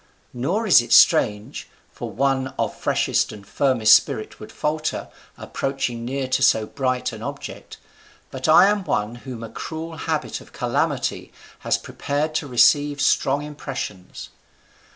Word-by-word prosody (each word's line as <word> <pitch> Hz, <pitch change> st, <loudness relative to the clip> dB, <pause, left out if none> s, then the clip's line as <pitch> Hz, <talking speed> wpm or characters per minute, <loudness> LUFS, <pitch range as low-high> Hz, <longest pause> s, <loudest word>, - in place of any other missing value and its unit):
Nor 170 Hz, -, -1 dB
is 180 Hz, -, +7 dB
it 120 Hz, -, -9 dB
strange; 105 Hz, 0 st, +3 dB, 0.2 s
for 120 Hz, -, -7 dB
one 130 Hz, +3 st, -1 dB
of -, -, -2 dB
freshest -, -, 0 dB
and 105 Hz, -2 st, -11 dB
firmest 115 Hz, -1 st, +3 dB
spirit 110 Hz, -, +1 dB
would 105 Hz, -, -10 dB
falter, 155 Hz, +1 st, -3 dB, 0.3 s
approaching 135 Hz, -4 st, -3 dB
near 130 Hz, +2 st, -3 dB
to 130 Hz, -, 0 dB
so 110 Hz, -, +4 dB
bright 130 Hz, +2 st, -2 dB
an -, -, -9 dB
object: -, -, -8 dB, 0.5 s
but 130 Hz, +1 st, -4 dB
I 160 Hz, +4 st, +7 dB
am 205 Hz, 0 st, +1 dB
one 105 Hz, -, -1 dB
whom 120 Hz, -1 st, -8 dB
a 115 Hz, -, -7 dB
cruel 160 Hz, +4 st, -7 dB
habit -, -, -3 dB
of -, -, -17 dB
calamity -, -, -2 dB, 0.3 s
has -, -, 0 dB
prepared 150 Hz, +2 st, -3 dB
to 155 Hz, -, -2 dB
receive 145 Hz, +3 st, +3 dB
strong 140 Hz, +1 st, +2 dB
impressions. 105 Hz, -10 st, -7 dB
135 Hz, 145 wpm, -22 LUFS, 115-150 Hz, 0.5 s, is